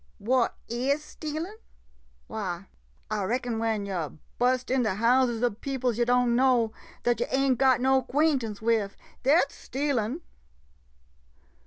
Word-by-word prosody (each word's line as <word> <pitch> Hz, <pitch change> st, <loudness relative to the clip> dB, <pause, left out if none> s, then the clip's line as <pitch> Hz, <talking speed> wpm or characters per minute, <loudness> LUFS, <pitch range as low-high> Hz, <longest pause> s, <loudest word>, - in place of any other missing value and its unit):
What 240 Hz, +3 st, +1 dB
is 265 Hz, +6 st, 0 dB
stealin'? 315 Hz, +8 st, -6 dB, 0.7 s
Why -, -, -5 dB, 0.2 s
— 65 Hz, +2 st, -29 dB
I 215 Hz, -1 st, 0 dB
reckon, 240 Hz, +1 st, -1 dB
when 220 Hz, -3 st, 0 dB
yo' 175 Hz, -6 st, -4 dB, 0.2 s
bust 255 Hz, +1 st, +1 dB
in 260 Hz, 0 st, +3 dB
de 215 Hz, -5 st, 0 dB
houses 240 Hz, +1 st, +2 dB
ob 235 Hz, -3 st, 0 dB
peoples 255 Hz, -4 st, -1 dB
yo' 240 Hz, -, +3 dB
don't 245 Hz, -1 st, +3 dB
know 245 Hz, -3 st, +3 dB
— -, -, -23 dB
dat 240 Hz, 0 st, +2 dB
yo' -, -, 0 dB
ain't 265 Hz, -2 st, +2 dB
got 265 Hz, -2 st, +5 dB
no 265 Hz, +1 st, +3 dB
'quaintance 260 Hz, -6 st, 0 dB
wif 220 Hz, -3 st, +1 dB
— -, -, -29 dB
dat 280 Hz, +3 st, +4 dB
's -, -, -16 dB
stealin' 270 Hz, 0 st, -2 dB
245 Hz, 155 wpm, -27 LUFS, 225-265 Hz, 0.7 s, got